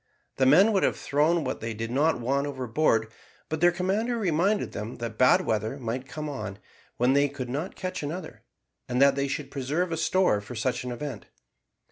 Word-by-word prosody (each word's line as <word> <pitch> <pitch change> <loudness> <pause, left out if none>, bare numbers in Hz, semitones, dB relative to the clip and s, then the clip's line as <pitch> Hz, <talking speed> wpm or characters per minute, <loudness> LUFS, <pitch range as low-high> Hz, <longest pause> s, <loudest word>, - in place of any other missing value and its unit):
The 130 - +3
men 190 +11 +6
would 195 - +3
have - - +1
thrown 155 +4 +1
what 130 -1 -4
they 115 0 -4
did 115 +2 -4
not 145 +3 +2
want 140 +4 0
overboard, 125 -4 0 0.4
but 155 0 -3
their 175 0 +6
commander 200 +7 -1
reminded 195 +1 +1
them 105 +3 -5
that 115 -2 -5
bad 130 - +6
weather 110 +4 -1
might 125 +1 -4
come 155 +1 -5
on, 105 -9 -5 0.4
when 125 +2 +3
they 140 +1 +3
could 135 -3 -6
not 150 +9 -4
catch 185 0 -4
another, 155 +3 -6 0.5
and 125 - 0
that 140 0 +6
they 140 0 -1
should 140 0 -4
preserve 150 +7 -1
a 165 - -1
store 180 - +2
for 105 +4 -9
such 125 +3 -1
an 125 - -4
event. 125 -3 -6
140 Hz, 195 wpm, -27 LUFS, 125-165 Hz, 0.5 s, men